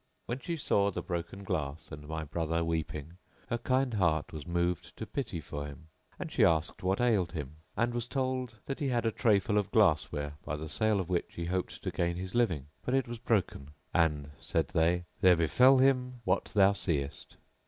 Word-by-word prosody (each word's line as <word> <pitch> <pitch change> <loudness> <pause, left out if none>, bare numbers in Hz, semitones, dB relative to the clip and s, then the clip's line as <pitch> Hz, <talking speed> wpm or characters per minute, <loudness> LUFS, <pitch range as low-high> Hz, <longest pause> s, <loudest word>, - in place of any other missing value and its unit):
When 120 +2 -3
she 170 +4 -3
saw 100 -8 +2
the 100 - -4
broken 85 +3 -4
glass 75 -3 -3
and 75 0 -8
my 80 0 -3
brother 80 +2 -1
weeping, 80 0 -3 0.3
her 120 - 0
kind 130 +1 +1
heart 85 -7 +1
was 75 -3 -7
moved 85 0 -1
to 110 - -4
pity 115 -9 -3
for 75 -1 -5
him, 80 +3 -12 0.3
and - - -6
she - - +3
asked 80 0 +2
what 95 +1 +1
ailed 105 -8 +2
him 75 -2 -5 0.2
and 120 0 +1
was 120 0 -2
told 130 -3 -2
that 135 - -4
he 145 - 0
had 120 -3 0
a 115 - +2
tray 110 -1 +4
full 105 +1 +1
of 100 - -2
glass 80 -9 +3
ware 75 0 -4
by 75 - -3
the 80 +1 -6
sale 110 +4 +1
of 90 - -2
which 90 -2 -1
he 85 - -3
hoped 90 +1 -3
to - - -2
gain 85 0 0
his 95 +1 -5
living, 95 - +1 0.2
but 125 - 0
it 135 -2 +1
was 120 -1 -6
broken, 95 - -1 0.2
and 75 -3 +1
(said - - -1
they), 85 +2 +2 0.2
"there 90 -1 +7
befell 125 - +5
him 125 -2 +2
what 90 -2 +1
thou 100 -2 +4
seest." 75 -7 -3
90 Hz, 205 wpm, -31 LUFS, 80-115 Hz, 0.3 s, there